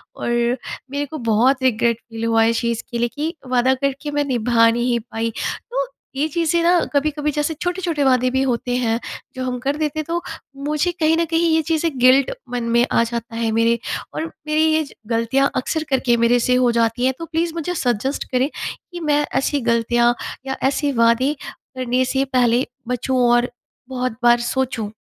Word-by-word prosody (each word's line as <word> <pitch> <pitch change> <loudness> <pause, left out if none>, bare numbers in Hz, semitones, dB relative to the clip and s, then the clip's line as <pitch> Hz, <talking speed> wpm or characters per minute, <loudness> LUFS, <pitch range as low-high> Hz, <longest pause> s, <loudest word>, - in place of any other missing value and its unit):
और - - -4 0.6
मेरे 285 +1 -1
को 310 +3 -7
बहुत 255 +5 +3
रिग्रेट 235 -2 +2
फ़ील 225 -1 -6
हुआ 225 0 +3
इस 230 0 +2
चीज़ 235 -1 -1
के 235 - -2
लिए 240 - +1
कि 310 +3 -2
वादा 255 +1 +3
करके 275 +2 -2
मैं 290 0 +1
निभा 235 -3 +3
नहीं 240 +1 +1
पाई। 225 +1 -2 0.4
तो - - -1 0.3
ये 290 +3 +1
चीज़ें 335 +1 +1
ना 350 +1 +5
कभी-कभी 300 +1 0
जैसे 295 +2 -1
छोटे-छोटे 355 -4 -1
वादे 255 -1 +3
भी 265 0 +1
होते 245 -1 -1
हैं, 230 -2 0 0.4
जो 260 - -4
हम 250 -1 -2
कर 275 +3 -1
देते 310 0 -1
तो 340 +2 -2 0.4
मुझे 305 +4 +1
कहीं 315 0 +3
न 335 - +2
कहीं 330 +1 +1
ये 320 - +3
चीज़ें 320 -3 0
गिल्ट 255 +2 +5 0.2
मन 245 -1 -2
में 240 +1 +5
आ 230 - +4
जाता 230 -1 -5
है 230 -1 0
मेरे। 230 +1 +2 0.3
और 320 - -3 0.2
मेरी 305 +1 +2
ये 315 0 +3
ज 280 - -12 0.2
गलतियाँ 230 +4 +2
अक्सर 310 +5 -1
करके 255 -3 +2
मेरे 235 +1 +3
से 250 +1 +2
हो 250 -1 +3
जाती 235 +1 +1
हैं। 265 - +2
तो 330 - -4
प्लीज़ 330 0 -1
मुझे 345 +2 -3
सजेस्ट 255 0 -1
करें 255 +3 +2 0.4
कि 350 - -6
मैं 295 -2 +1
ऐसी 280 +1 0
गलतियाँ 235 +1 +3 0.3
या 265 - -2
ऐसे 285 +1 0
वादे 255 +5 +3 0.2
करने 255 -1 -2
से 270 0 +1
पहले 245 0 +3 0.2
बचूँ 250 +1 -1
और 240 +1 +3 0.4
बहुत 255 -1 -2
बार 240 0 +6
सोचूँ। 250 -5 -2
260 Hz, 190 wpm, -20 LUFS, 235-300 Hz, 0.6 s, बार